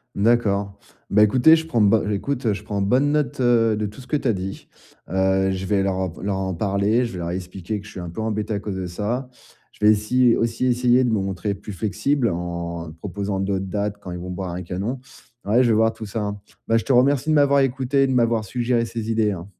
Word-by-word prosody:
D'accord. 100 -2 +1 0.3
Bah, 105 +1 +5
écoutez, 130 +9 +6
je 160 0 -2
prends 120 -8 0
ben, 105 +1 +3
écoute, 125 +5 -2
heu, 105 - +3
je - - -7
prends 100 -1 -3
bonne 130 +8 +2
note, 150 -3 -1
heu, 115 -3 +3
de 105 0 -2
tout 105 +5 -12
ce 125 - -11
que 150 - -2
tu 140 - -1
as 115 - +3
dit, 95 0 -6 0.4
heu, 95 +1 +2
je 95 0 -3
vais 100 0 +1
leur 95 -1 0
en 95 -1 -1
v 80 - -12
leur 100 -1 -1
en 95 -1 -2
parler, 100 +6 +1
je 115 - -6
vais - - -6
leur 85 0 -3
expliquer 95 +3 -5
que 105 - -12
je - - -11
suis 95 - -8
un 85 -1 -6
peu 110 - -5
embêté, 110 -1 -2
à 100 - -1
cause 100 -1 -5
de 95 -1 -4
ça. 110 +9 -3 0.4
Je - - -13
vais 105 - +7
essy 120 +3 +3
aussi 115 +2 0
essayer 125 +1 +3
de 125 - +1
me 110 - +1
montrer 95 +1 -2
plus 100 +1 -9
flexible, 115 - 0
en 85 -1 -4
proposant 100 +1 -3
d'autres 95 0 -1
dates, 105 +1 -2
quand 95 - -8
ils 90 - -5
vont 90 +1 -7
boire 90 -1 -4
un 90 - -5
canon. 100 +9 -4 0.5
Ouais, 115 +5 +4
je 120 - +2
vais 110 - +4
voir 110 +1 +3
tout 110 -1 -8
ça. 105 0 -3 0.3
Bah, 115 - +3
je - - -2
te 135 - +2
remercie 135 +4 +3
de - - +4
m'avoir 140 -2 +4
écouté, 135 +1 +1
et 135 - +2
de 130 - 0
m'avoir 115 -3 +2
suggéré 120 +1 0
ces 115 -1 -5
idées, 110 -2 +2
hein. 90 -1 -6
105 Hz, 255 wpm, -22 LUFS, 95-120 Hz, 0.5 s, vais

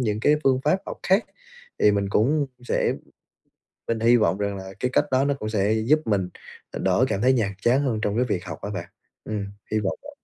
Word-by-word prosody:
những 110 -3 -1
cái 150 +4 +4
phương 130 -1 +3
pháp 170 +6 +3
học - - -6
khác. 195 +4 +3 0.5
Thì 105 - +5
mình 100 -1 0
cũng 140 +8 +2 0.2
sẽ - - +1 1.0
mình 115 -1 -1
hy 120 +2 +5
vọng 105 -3 +2
rằng 100 -1 -2
là 95 0 -8
cái 125 - -1
cách 145 - +3
đó 130 +1 +3
nó 140 - +2
cũng 110 - -3
sẽ 105 0 +1
giúp 120 +8 +3
mình 95 -4 0 0.4
đỡ 130 - +2
cảm 100 -1 -1
thấy 130 +2 +4
nhàm 105 -5 +1
chán 125 +4 +3
hơn 115 -5 0
trong 105 0 -1
cái 125 - +2
việc 95 -6 -2
học - - -7
á 100 - -4
bạn. 85 -3 -5 0.4
Ừm, 105 -2 -3 0.3
hy 110 - +2
vọng 95 -2 -2
vậy. 285 0 -13
110 Hz, 230 wpm, -24 LUFS, 100-130 Hz, 1.0 s, Thì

